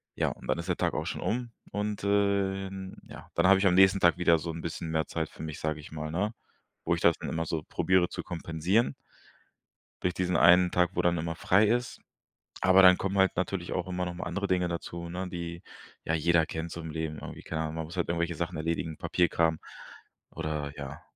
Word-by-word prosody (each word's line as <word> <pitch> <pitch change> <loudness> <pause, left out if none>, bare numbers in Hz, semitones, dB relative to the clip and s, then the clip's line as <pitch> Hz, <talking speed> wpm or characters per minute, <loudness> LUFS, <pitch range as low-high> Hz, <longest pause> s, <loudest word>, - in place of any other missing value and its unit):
Ja, - - +1
und - - -9
dann - - 0
ist 85 +2 -6
der 90 - +1
Tag - - 0
auch - - -2
schon - - -4
um 120 +1 -2 0.2
und, 105 0 -3
äh, 100 -1 +1
in 95 0 -8
ja. - - -12
Dann 85 +2 +4
habe 95 0 +7
ich 100 - +1
am 90 - +4
nächsten 95 +1 +6
Tag 85 - +5
wieder 85 -2 +4
so 85 +2 -4
'n 80 0 -6
bisschen 80 0 -5
mehr 80 -1 0
Zeit 80 -2 -3
für - - -12
mich, 80 -2 -6
sage 80 -1 -2
ich 75 - -11
mal, 80 0 -5
ne? 100 +7 -1 0.5
Wo 85 - +2
ich 85 - -6
das 85 - +5
dann - - -5
immer 80 0 -2
so 80 -1 -3
probiere 90 0 +2
zu - - -5
kompensieren 85 +6 0 1.1
durch 90 - +1
diesen 90 0 0
1 90 +1 +6
Tag, 90 -1 +2
wo - - +1
dann 85 0 +2
immer 85 0 -3
frei 95 +5 +4
ist. 120 +3 0 0.6
Aber 95 +1 +6
dann 90 -1 +8
kommen 95 +1 -2
halt 95 0 +3
natürlich 90 -1 -2
auch 90 -1 -2
immer 90 -1 -2
noch 90 - -4
mal 85 - -5
andere 95 +3 -2
Dinge 90 -2 +1
dazu, 85 0 -5
ne, 90 +1 -4
die 85 -1 -6 0.4
ja 80 - 0
jeder 80 0 +3
kennt 80 +2 -5
so 85 - -6
im 80 -1 -6
Leben, 80 -1 -4
irgendwie - - -8
keine 80 - -4
Ahnung. 80 0 -4
Man 80 0 -3
muss 85 +3 -9
halt 85 - 0
irgendwelche 85 0 -1
Sachen 85 +1 -3
erledigen, 80 0 -2
Papierkram, 85 -2 +1 0.7
oder 75 -2 -4
ja. 70 0 -7
85 Hz, 230 wpm, -29 LUFS, 80-95 Hz, 1.1 s, dann